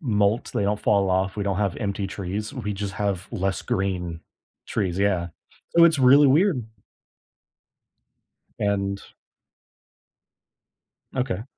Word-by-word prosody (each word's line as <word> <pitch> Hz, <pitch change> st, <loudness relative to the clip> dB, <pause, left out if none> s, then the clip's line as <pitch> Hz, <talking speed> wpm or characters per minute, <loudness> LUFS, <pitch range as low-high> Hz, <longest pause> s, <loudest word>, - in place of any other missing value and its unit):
molt, 105 Hz, -4 st, +1 dB
they -, -, +1 dB
don't 105 Hz, +1 st, 0 dB
fall 100 Hz, -2 st, +2 dB
of, 95 Hz, +1 st, 0 dB
we 105 Hz, -, -2 dB
don't 100 Hz, -2 st, -1 dB
have 100 Hz, -3 st, -1 dB
empty 100 Hz, -2 st, -2 dB
trees, 100 Hz, +6 st, -5 dB
we 110 Hz, -6 st, -3 dB
just 100 Hz, 0 st, -4 dB
have 100 Hz, -2 st, -2 dB
less 95 Hz, 0 st, -1 dB
green 90 Hz, -4 st, -2 dB, 0.5 s
trees, 95 Hz, -3 st, -2 dB
yeah. 95 Hz, -4 st, +1 dB, 0.5 s
So 170 Hz, -, +8 dB
it's 165 Hz, -3 st, +4 dB
really 140 Hz, +3 st, +7 dB
weird. 150 Hz, -, +3 dB, 1.9 s
And 100 Hz, -1 st, -1 dB, 2.1 s
Okay. 120 Hz, -5 st, -2 dB
100 Hz, 120 wpm, -24 LUFS, 95-110 Hz, 2.1 s, So